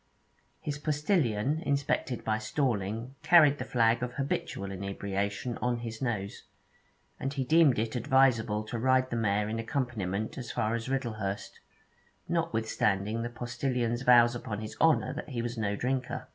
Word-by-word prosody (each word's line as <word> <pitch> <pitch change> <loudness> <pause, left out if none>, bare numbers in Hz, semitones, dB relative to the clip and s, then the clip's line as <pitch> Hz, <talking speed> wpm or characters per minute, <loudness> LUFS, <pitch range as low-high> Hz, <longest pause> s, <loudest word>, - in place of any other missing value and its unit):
His 150 -1 -4
postillion, 150 - +1
inspected 140 -4 -1
at 110 0 +1
Storling, 115 -1 -1
carried 150 -2 +6
the - - -2
flag 115 -1 +2
of 125 -1 -3
habitual 125 -7 -3
inebriation 100 +4 -3
on 125 -1 0
his 115 -1 -6
nose, 105 -6 -3 0.8
and 135 - -2
he 140 -2 -2
deemed 155 0 +5
it 110 +2 -1
adviseable 120 -4 +3
to 120 - -3
ride 130 +1 +2
the - - -1
mare 105 -2 +1
in 110 +1 -3
accompaniment 110 -4 -2
as 120 - -6
far 110 +1 0
as 115 +1 -3
Riddlehurst, 110 -7 -3 0.7
notwithstanding 115 - 0
the 120 - -3
postillion's 120 0 -2
vows 120 -2 +6
upon 110 -3 -5
his 110 - -7
honour 155 -5 +3
that 150 - -6
he 120 -4 -3
was 120 0 -3
no 105 -3 -1
drinker. 130 +3 -2
120 Hz, 150 wpm, -29 LUFS, 110-135 Hz, 0.8 s, carried